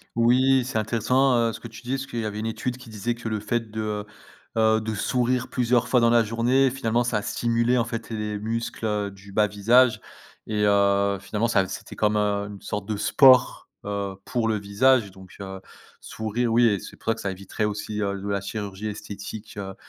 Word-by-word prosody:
Oui, 125 Hz, +2 st, +4 dB
c'est 130 Hz, -3 st, -1 dB
intéressant 115 Hz, +1 st, +2 dB
ce -, -, -8 dB
que -, -, -8 dB
tu 120 Hz, -, -12 dB
dis 125 Hz, -, -5 dB
parce 135 Hz, 0 st, -2 dB
qu'il 120 Hz, -, -4 dB
y 110 Hz, -, -2 dB
avait 105 Hz, 0 st, -4 dB
une 110 Hz, -, -2 dB
étude 125 Hz, +2 st, -3 dB
qui 125 Hz, -3 st, -13 dB
disait 110 Hz, +2 st, -2 dB
que 115 Hz, -1 st, -6 dB
le 110 Hz, -1 st, -2 dB
fait 115 Hz, 0 st, -2 dB
de 110 Hz, +1 st, -6 dB
heu, 105 Hz, -1 st, -3 dB, 0.5 s
heu 110 Hz, 0 st, +4 dB
de 110 Hz, 0 st, -3 dB
sourire 125 Hz, +3 st, 0 dB
plusieurs 125 Hz, -1 st, +1 dB
fois 125 Hz, 0 st, +3 dB
dans 115 Hz, 0 st, +4 dB
la 115 Hz, -1 st, +5 dB
journée 120 Hz, +4 st, +2 dB
finalement 120 Hz, -3 st, 0 dB
ça 105 Hz, -3 st, 0 dB
stimulait 115 Hz, +3 st, +1 dB
en 115 Hz, -, +2 dB
fait 115 Hz, 0 st, -5 dB
les 105 Hz, -2 st, -3 dB
muscles 110 Hz, -2 st, -2 dB
du 100 Hz, 0 st, -14 dB
bas 105 Hz, +2 st, +3 dB
visage 110 Hz, +3 st, +3 dB, 0.5 s
et 105 Hz, -1 st, 0 dB
heu, 100 Hz, -1 st, +3 dB
finalement 105 Hz, +3 st, -1 dB
ça, 100 Hz, -5 st, +2 dB
c'était -, -, -8 dB
comme 105 Hz, 0 st, +1 dB
heu, 100 Hz, -1 st, 0 dB
une 100 Hz, -1 st, -9 dB
sorte 105 Hz, 0 st, -5 dB
de 110 Hz, -, -2 dB
sport, 130 Hz, +4 st, +5 dB, 0.2 s
heu, 100 Hz, -1 st, -3 dB
pour 120 Hz, -3 st, -1 dB
le 110 Hz, -, +1 dB
visage 105 Hz, +2 st, +2 dB
donc 95 Hz, -1 st, -15 dB
heu, 95 Hz, -1 st, -7 dB, 0.4 s
sourire 115 Hz, +2 st, -2 dB
oui 120 Hz, +1 st, +5 dB
et 105 Hz, -4 st, +3 dB
c'est -, -, -11 dB
pour -, -, -23 dB
ça -, -, +4 dB
que -, -, -9 dB
ça 100 Hz, -, -2 dB
éviterait 100 Hz, +3 st, -4 dB
aussi 105 Hz, 0 st, -3 dB
heu, 100 Hz, -1 st, -1 dB
de 100 Hz, -, -6 dB
la 100 Hz, -1 st, -1 dB
chirurgie 100 Hz, 0 st, -5 dB
esthétique, 105 Hz, 0 st, -8 dB
heu, 95 Hz, -1 st, -6 dB
110 Hz, 215 wpm, -25 LUFS, 100-120 Hz, 0.5 s, la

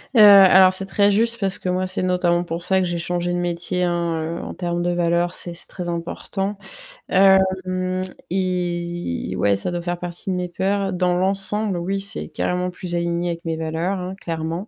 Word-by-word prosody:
Heu, -, -, +6 dB
alors 190 Hz, -2 st, +8 dB
c'est 195 Hz, +1 st, +1 dB
très 200 Hz, +1 st, +2 dB
juste 230 Hz, +3 st, +2 dB
parce 195 Hz, -2 st, 0 dB
que 185 Hz, -, -3 dB
moi, 185 Hz, +1 st, 0 dB
c'est 185 Hz, 0 st, 0 dB
notamment 175 Hz, -1 st, +1 dB
pour 170 Hz, 0 st, -5 dB
ça 190 Hz, +1 st, +2 dB
que 185 Hz, -, +1 dB
j'ai 175 Hz, -1 st, -2 dB
changé 175 Hz, +1 st, -2 dB
de 175 Hz, -, -1 dB
métier, 175 Hz, +1 st, -1 dB
hein, 170 Hz, -1 st, 0 dB, 0.2 s
heu, -, -, -7 dB
en -, -, -6 dB
termes 175 Hz, -1 st, -3 dB
de 175 Hz, 0 st, 0 dB
valeurs, 175 Hz, 0 st, 0 dB
c'est 175 Hz, -, -1 dB
c'est 170 Hz, -, -1 dB
très 180 Hz, -2 st, -5 dB
important. 195 Hz, +4 st, -4 dB, 0.5 s
Hem 185 Hz, -1 st, +2 dB, 0.3 s
et 175 Hz, -, -2 dB
ouais, 100 Hz, 0 st, +2 dB
ça 100 Hz, -, -2 dB
doit 175 Hz, 0 st, -3 dB
faire 175 Hz, 0 st, -3 dB
partie 175 Hz, +3 st, -6 dB
de 185 Hz, -, 0 dB
mes 180 Hz, -1 st, -3 dB
peurs. 195 Hz, +2 st, -1 dB
Dans 180 Hz, 0 st, +1 dB
l'ensemble, 195 Hz, +2 st, 0 dB
oui, 195 Hz, +3 st, -2 dB
c'est 200 Hz, -, -4 dB
carrément 180 Hz, 0 st, -1 dB
plus 180 Hz, -1 st, -5 dB
aligné 170 Hz, 0 st, -1 dB
avec 170 Hz, 0 st, -5 dB
mes 165 Hz, -1 st, -1 dB
valeurs, 165 Hz, +4 st, -2 dB
hein, 185 Hz, +1 st, -5 dB
clairement. 165 Hz, +4 st, -4 dB
180 Hz, 200 wpm, -21 LUFS, 175-190 Hz, 0.5 s, alors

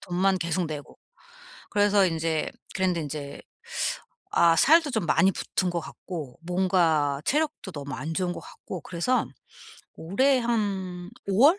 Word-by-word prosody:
돈만 185 Hz, +2 st, +1 dB
계속 170 Hz, +1 st, 0 dB
내고. 150 Hz, -2 st, -7 dB, 0.7 s
그래서 205 Hz, -1 st, +4 dB
인제 165 Hz, -2 st, 0 dB, 0.2 s
그랬는데 185 Hz, -3 st, +1 dB
인제 145 Hz, -1 st, -6 dB, 0.9 s
아 170 Hz, -1 st, +5 dB
살도 310 Hz, -, +5 dB
좀 220 Hz, -7 st, 0 dB
많이 190 Hz, +3 st, +4 dB
붙은 185 Hz, 0 st, -1 dB
것 175 Hz, -1 st, -1 dB
같고 155 Hz, -5 st, -8 dB
뭔가 170 Hz, -6 st, +2 dB
체력도 300 Hz, -8 st, 0 dB
너무 140 Hz, -2 st, -6 dB
안 155 Hz, +5 st, -4 dB
좋은 180 Hz, +1 st, 0 dB
것 -, -, -7 dB
같고 180 Hz, -, -9 dB
그래서 175 Hz, -, 0 dB, 0.7 s
올해 260 Hz, +11 st, +2 dB
한 195 Hz, -6 st, -2 dB, 0.2 s
5 195 Hz, 0 st, +1 dB
월? 340 Hz, +6 st, +5 dB
180 Hz, 250 characters per minute, -26 LUFS, 160-200 Hz, 0.9 s, 아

